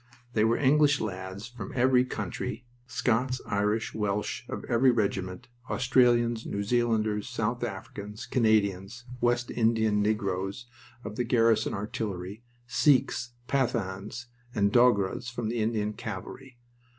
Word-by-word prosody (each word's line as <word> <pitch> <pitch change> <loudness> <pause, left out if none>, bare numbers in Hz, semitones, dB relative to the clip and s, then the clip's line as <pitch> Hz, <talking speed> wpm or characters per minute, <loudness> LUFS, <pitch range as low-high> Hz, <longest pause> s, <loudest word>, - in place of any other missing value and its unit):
They 110 - +3
were 115 +1 +3
English 145 +1 +4
lads 95 +1 -5
from 120 -5 -8
every 125 0 +4
country; 110 +1 -4 0.2
Scots, 125 +1 0
Irish, 105 +3 0
Welsh, 105 -1 -2
of - - -5
every 125 +3 +4
regiment; 100 -3 -1 0.2
Australians, 120 -2 +3
New 100 - -3
Zealanders, 110 -1 +1
South 120 0 -2
Africans, 105 +1 -6
Canadians, 110 -1 +1 0.2
West 120 0 +1
Indian 110 -2 +2
negroes 100 +1 -1 0.4
of 105 0 -7
the 125 - +1
Garrison 115 -2 +2
Artillery; 100 -1 -4 0.2
Sikhs, 125 -1 +2
Pathans, 115 -4 -1 0.3
and 100 -1 +2
Dogras 120 0 +3
of 115 -3 -1
the 120 +1 -2
Indian 110 -1 0
Cavalry. 120 +5 -8
110 Hz, 120 wpm, -28 LUFS, 105-120 Hz, 0.4 s, English